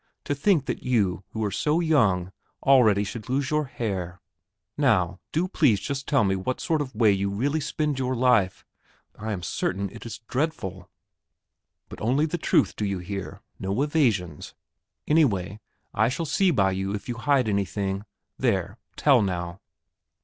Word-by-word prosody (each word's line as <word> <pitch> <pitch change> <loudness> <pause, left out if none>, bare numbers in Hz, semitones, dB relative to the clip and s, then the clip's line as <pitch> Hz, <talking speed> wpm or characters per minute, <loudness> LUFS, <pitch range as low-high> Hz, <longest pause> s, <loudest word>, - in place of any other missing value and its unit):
To - - -1
think 150 0 +2
that - - -3
you, 100 -7 +1
who 110 - -4
are 100 - -1
so 160 - +1
young, 110 - +2 0.3
already 115 -7 +5
should 110 +3 -7
lose 135 +2 0
your 150 0 +1
hair! 95 -9 -4 0.6
Now, 90 +1 +2
do 170 +4 0
please 145 - +3
just 140 +3 -4
tell 140 -6 +3
me 95 -1 +2
what 110 +7 -3
sort 160 -2 0
of 130 -5 -5
way 110 -2 +5
you 100 0 0
really 135 +10 0
spend 150 -1 -2
your 130 0 0
life 120 -7 +2 0.5
I 110 +1 -5
am 95 -4 -4
certain 95 +2 -2
it - - -10
is 115 - -6
dreadful! 95 - -3 1.0
But - - -11
only 130 +8 +2
the 170 +2 -3
truth, - - +2
do - - -3
you 100 -2 -1
hear; 95 +1 -6 0.2
no 95 +3 -2
evasions. 110 - 0 0.5
Anyway, 105 - +2 0.3
I 110 +3 +3
shall 165 +6 -2
see 190 +5 +2
by 100 - +3
you 95 +1 -2
if 100 - -7
you 120 -2 -4
hide 130 -1 +2
anything 100 0 -1 0.4
there, 100 -5 0 0.2
tell 135 -5 +5
now!" 90 -2 -3
110 Hz, 165 wpm, -25 LUFS, 95-140 Hz, 1.0 s, already